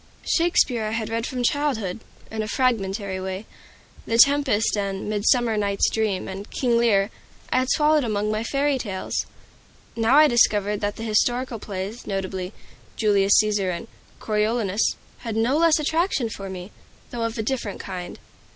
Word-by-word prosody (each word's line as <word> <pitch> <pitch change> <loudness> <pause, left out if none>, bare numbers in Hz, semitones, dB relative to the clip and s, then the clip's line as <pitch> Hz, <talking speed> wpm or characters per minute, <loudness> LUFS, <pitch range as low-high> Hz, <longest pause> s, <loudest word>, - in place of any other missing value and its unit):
Shakespeare 290 -9 +2
I 215 - -2
had 220 -1 -3
read 230 +1 -2
from 250 -1 -3
childhood, 240 -9 0 0.3
in 220 0 -2
a 215 - -3
fragmentary 200 -6 0
way. 190 +2 -5 0.6
"The 230 - +1
Tempest," 275 -5 +4
and 195 -1 -3
"Midsummer 220 +2 +2
Night's 200 -1 +1
Dream," 215 -4 -1
and 195 +2 -7
"King 245 -3 0
Lear," 210 -3 +3 0.4
I 255 - +3
had 255 0 -1
swallowed 300 0 +3
among 210 -2 -1
my 215 +1 -1
fairy 275 +2 0
tales. 195 -6 -3 0.7
Now 230 +3 +3
I 305 +1 +8
discovered 210 -4 +2
that 205 0 -1
the 225 - -7
historical 240 +2 0
plays, 200 +3 -6
notably, 190 -1 -3 0.4
"Julius 200 -2 +3
Caesar" 205 -3 +2
and 175 +5 -4 0.3
"Coriolanus," 215 -1 0 0.2
had 230 -3 -5
no 230 +5 +2
less 325 0 +4
attraction 310 - 0
for 195 -2 -7
me, 185 +1 -8 0.4
though 240 - -4
of 230 0 -2
a 220 - -1
different 230 -4 -3
kind. 180 -2 -6
220 Hz, 160 wpm, -24 LUFS, 200-245 Hz, 0.7 s, I